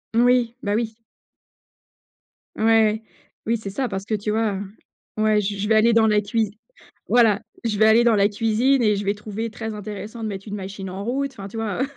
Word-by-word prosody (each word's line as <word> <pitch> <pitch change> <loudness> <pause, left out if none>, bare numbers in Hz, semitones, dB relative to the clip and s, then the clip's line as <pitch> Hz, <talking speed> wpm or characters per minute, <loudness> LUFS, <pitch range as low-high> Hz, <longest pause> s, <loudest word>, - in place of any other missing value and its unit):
Oui, 240 0 +3
bah 205 0 -1
oui. 225 -1 -2 1.6
Ouais, 220 0 +3 0.5
oui 230 0 +2
c'est 200 -3 -7
ça, 260 +4 -2
parce 195 0 -4
que 220 - -3
tu 210 0 -2
vois? 215 -3 0 0.6
Ouais 215 -1 +3
je 200 0 -3
je 205 +1 -2
vais 220 - +3
aller 225 +1 +5
dans 225 -1 +4
la 210 -1 +3
cuisi 210 0 -2 0.5
voilà, 225 -4 +4 0.2
je 215 -3 -1
vais 215 - +5
aller 225 +2 +5
dans 235 - +4
la 200 0 +4
cuisine 225 +5 +2
et 210 -2 +3
je 200 - -3
vais 200 - +1
trouver 215 +2 -5
très 220 -1 -6
intéressant 210 +2 -7
de 220 - -2
mettre 195 +1 -7
une 205 - -5
machine 195 -1 -6
en 190 +2 -6
route, 270 +3 -2
enfin, 200 -4 -8
tu 225 - -8
vois? 225 +2 -2
215 Hz, 205 wpm, -22 LUFS, 205-230 Hz, 1.6 s, aller